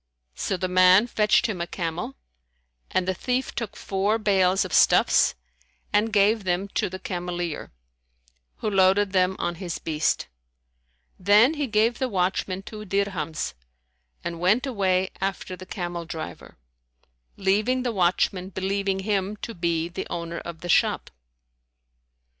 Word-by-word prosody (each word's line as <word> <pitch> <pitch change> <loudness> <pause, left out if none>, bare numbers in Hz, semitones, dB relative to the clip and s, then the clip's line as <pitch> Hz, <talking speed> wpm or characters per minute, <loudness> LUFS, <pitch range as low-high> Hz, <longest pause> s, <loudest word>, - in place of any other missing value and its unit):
So 190 - -2
the 185 - -1
man 185 +3 +6
fetched 215 -3 +2
him 200 -6 -2
a 170 - -2
camel, 165 -6 -4 0.7
and 185 -1 0
the 190 - +1
thief 250 +7 -2
took 230 -4 -4
four 200 +3 0
bales[FN#157] 195 -3 +2
of 180 - -7
stuffs - - +4 0.6
and 215 +2 +2
gave 210 +1 +3
them 185 +1 -1
to - - -1
the 185 - -6
cameleer, 175 -3 -4 0.9
who 215 - -2
loaded 195 +1 +4
them 185 0 +2
on 175 0 -1
his 175 -3 -3
beast. 155 -1 -1 0.9
Then 210 - +5
he 295 -3 -2
gave 225 +1 +2
the 260 - 0
watchman 190 -1 -1
two 215 +1 -8
dirhams 185 - -2 0.7
and 170 -1 -4
went 205 +9 +3
away 190 -7 0
after 190 -1 -3
the 185 0 -12
camel 175 -3 -4
driver, 160 - -8 0.8
leaving 215 +7 +1
the 245 - 0
watchman 185 0 +1
believing 195 0 -1
him 200 0 -1
to 230 - -4
be 170 -2 -1
the 175 - -6
owner 170 0 -4
of 170 -1 -8
the 175 - -6
shop. - - +2
190 Hz, 140 wpm, -25 LUFS, 175-205 Hz, 0.9 s, man